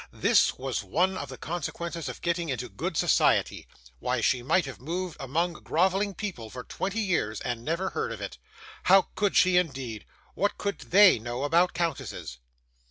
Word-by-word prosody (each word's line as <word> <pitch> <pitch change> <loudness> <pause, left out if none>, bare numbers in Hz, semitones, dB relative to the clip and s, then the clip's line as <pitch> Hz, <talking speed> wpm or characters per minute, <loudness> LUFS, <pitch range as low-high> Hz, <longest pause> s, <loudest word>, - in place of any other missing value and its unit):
This - - +3
was 130 -4 -3
one 180 - +1
of 140 -7 -5
the 130 - -8
consequences 170 -1 -4
of 125 - -9
getting 170 -1 -1
into 125 -2 -3
good 100 - -4
society. - - +2 0.3
Why, 125 - -1
she 125 +2 +2
might 165 +9 +2
have 135 - -8
moved 175 +4 -3
among 165 +6 -1
grovelling 190 +4 +1
people 175 - -5
for 125 +2 -8
twenty 195 +4 -3
years, 165 - 0
and 120 -2 -3
never 170 +6 -1
heard 450 +2 -2
of - - -6
it. - - -7 0.5
How 190 +1 +6
could 205 -2 0
she, 185 -1 +5
indeed? 135 -10 -2 0.3
what 205 - 0
did 200 -1 -3
THEY 195 - +7
know 120 +4 -4
about 170 +5 +3
countesses? 165 - -3
165 Hz, 170 wpm, -27 LUFS, 125-185 Hz, 0.5 s, THEY